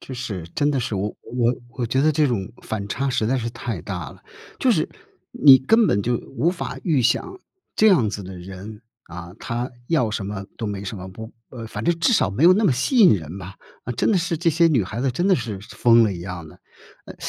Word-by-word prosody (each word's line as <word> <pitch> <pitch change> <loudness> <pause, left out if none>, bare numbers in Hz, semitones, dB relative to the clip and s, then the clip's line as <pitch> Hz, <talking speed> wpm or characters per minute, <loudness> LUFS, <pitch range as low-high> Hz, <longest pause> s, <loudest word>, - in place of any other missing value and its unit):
就 130 - -8
是 105 -9 -5
真 145 0 +2
的 135 - 0
是 110 - -3
我 100 +2 -1
我 120 0 0 0.2
我 125 -1 -3
觉 130 +4 +1
得 155 - +4
这 150 0 +3
种 105 -8 -2
反 100 -2 -4
差 135 +7 -1
实 125 -4 0
在 130 +4 +1
是 115 -1 -3
太 115 -7 -5
大 90 -8 -5
了， - - -17 0.4
就 - - +2
是 - - 0 0.4
你 135 -2 +8
根 220 - +3
本 100 - +1
就 120 +2 0 0.2
无 170 - +2
法 180 - -5
预 150 -8 +2
想 375 - 0 0.4
这 220 - +5
样 160 - +4
子 105 - -5
的 95 0 -9
人， 95 +4 -9 0.2
啊， 85 +1 -10
他 120 +2 -4 0.2
要 130 -9 +2
什 105 -1 -3
么 100 -1 -5
都 115 - -4
没 100 -2 -4
什 105 +3 -5
么， 95 0 -8
不 110 +3 -9 0.2
呃， 115 -3 -8
反 105 0 -6
正 170 -1 +1
至 205 - +3
少 95 - +2
没 120 +11 0
有 180 +2 +8
那 215 +3 +1
么 175 - +4
吸 130 - -1
引 200 - +7
人 80 -2 -6
吧， 95 +1 -9 0.3
啊， 125 - -3
真 120 - +1
的 - - +3
是 170 -1 -1
这 170 +1 +1
些 165 +2 +4
女 135 -9 +2
孩 110 +5 -5
子 135 - +1
真 175 +10 0
的 190 - +5
是 110 -5 -5
疯 115 +3 +3
了 105 - 0
一 85 - -7
样 90 -2 -7
的。 - - -16 0.5
诶， - - -10
115 Hz, 265 characters per minute, -22 LUFS, 100-145 Hz, 0.5 s, 你